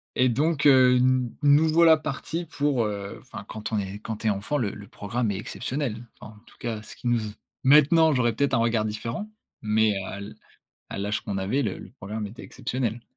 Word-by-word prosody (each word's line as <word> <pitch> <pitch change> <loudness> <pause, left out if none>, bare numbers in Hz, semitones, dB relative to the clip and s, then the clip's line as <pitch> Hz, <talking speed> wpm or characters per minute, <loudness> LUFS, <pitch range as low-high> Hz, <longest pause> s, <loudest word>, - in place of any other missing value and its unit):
et 130 - +4
donc, 145 +5 +1
heu, 130 -3 +7
n 125 -1 +2
nous 145 +2 +5
voilà 165 0 +6
partis 155 +2 -4
pour, 145 -5 0
heu, 100 -1 -5
enfin, - - -10
quand 110 0 -6
est 100 +1 -5
quand 110 0 -5
tu 110 - -3
es - - +5
enfant, 100 +8 -1
le 110 -8 -1
le 100 -1 -11
programme 110 +3 -2
est 100 - -3
exceptionnel. 120 +2 -4
Enfin, 110 - -11
en - - -17
tout - - -20
cas, 115 -2 -4
ce 105 - -12
qui - - -6
nous 120 0 +3
ze 110 -1 -5 0.3
maintenant, 150 +3 +6
j'aurais 120 -3 +2
peut-être 140 +3 0
un - - +4
regard 115 -1 +2
différent, 115 - -4 0.3
mais 110 -1 +2
à 95 - -6
l 100 +2 -8 0.6
à - - -5
l'âge 105 +2 -2
qu'on 100 - -3
avait, 105 +9 0
le 105 -7 -3
le - - -11
programme 105 +2 -6
était 110 - -11
exceptionnel. 120 -2 -3
120 Hz, 215 wpm, -26 LUFS, 105-140 Hz, 0.6 s, heu